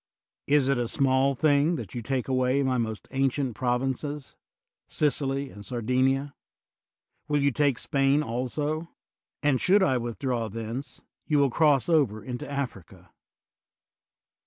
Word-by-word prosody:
Is 145 Hz, -2 st, +3 dB
it 135 Hz, -2 st, +2 dB
a 120 Hz, -, -1 dB
small 135 Hz, +1 st, +2 dB
thing 150 Hz, +3 st, +3 dB
that 115 Hz, -, -7 dB
you 120 Hz, -, -4 dB
take 130 Hz, +2 st, -2 dB
away 130 Hz, +1 st, +1 dB
my 130 Hz, -2 st, +1 dB
most 110 Hz, -2 st, -4 dB
ancient 135 Hz, -1 st, 0 dB
provinces 130 Hz, +3 st, -2 dB, 0.3 s
— -, -, -66 dB, 0.2 s
Sicily 140 Hz, -2 st, 0 dB
and 105 Hz, -, -11 dB
Sardinia? 130 Hz, +4 st, 0 dB, 0.9 s
Will 145 Hz, -2 st, +1 dB
you 140 Hz, -, +3 dB
take 140 Hz, -2 st, +1 dB
Spain 140 Hz, +3 st, +2 dB
also? 150 Hz, +6 st, -3 dB, 0.5 s
And 145 Hz, -3 st, +2 dB
should 195 Hz, +2 st, +4 dB
I 130 Hz, -9 st, +2 dB
withdraw 120 Hz, -1 st, -2 dB
thence, 115 Hz, +5 st, -6 dB, 0.3 s
you 150 Hz, -, +2 dB
will 140 Hz, -2 st, +3 dB
cross 145 Hz, -2 st, +3 dB
over 140 Hz, -11 st, +2 dB
into 125 Hz, 0 st, -6 dB
Africa. 130 Hz, -, -6 dB
135 Hz, 135 wpm, -27 LUFS, 125-145 Hz, 0.9 s, should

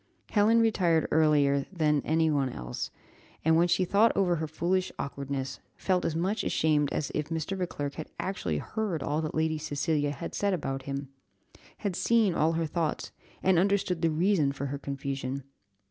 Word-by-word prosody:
Helen 220 Hz, +2 st, +4 dB
retired 180 Hz, -8 st, +2 dB
earlier 145 Hz, -3 st, +3 dB
than 150 Hz, -5 st, +2 dB
any 160 Hz, 0 st, +2 dB
one 140 Hz, -3 st, +1 dB
else, 60 Hz, -, -5 dB, 0.6 s
and, 160 Hz, 0 st, +5 dB
when 170 Hz, +2 st, +4 dB
she 175 Hz, +2 st, +2 dB
thought 205 Hz, +5 st, +4 dB
over 180 Hz, -3 st, +3 dB
her 160 Hz, 0 st, -2 dB
foolish 180 Hz, +4 st, 0 dB
awkwardness, 140 Hz, -1 st, -4 dB, 0.2 s
felt 185 Hz, -2 st, +1 dB
as 160 Hz, -, -1 dB
much 190 Hz, +6 st, 0 dB
ashamed 150 Hz, -2 st, +2 dB
as 145 Hz, -, -2 dB
if 150 Hz, 0 st, -2 dB
Mr. 165 Hz, +3 st, -2 dB
Beauclerc 145 Hz, -6 st, -3 dB
had 155 Hz, -, -7 dB
actually 90 Hz, -, -2 dB
heard 190 Hz, -, -3 dB
all 150 Hz, +3 st, 0 dB
that 155 Hz, -, -4 dB
Lady 160 Hz, 0 st, +1 dB
Cecilia 145 Hz, 0 st, 0 dB
had 145 Hz, -, -5 dB
said 200 Hz, -2 st, +1 dB
about 135 Hz, -5 st, -3 dB
him 140 Hz, 0 st, -4 dB, 0.7 s
had 195 Hz, -3 st, -2 dB
seen 225 Hz, -4 st, +3 dB
all 160 Hz, +1 st, +2 dB
her 165 Hz, 0 st, 0 dB
thoughts, 160 Hz, 0 st, -2 dB, 0.3 s
and 185 Hz, -2 st, +4 dB
understood 190 Hz, -2 st, +1 dB
the 165 Hz, -, +3 dB
reason 165 Hz, -1 st, +2 dB
of 140 Hz, -, -6 dB
her 140 Hz, 0 st, -3 dB
confusion. 140 Hz, -1 st, -4 dB
160 Hz, 175 wpm, -29 LUFS, 145-180 Hz, 0.7 s, and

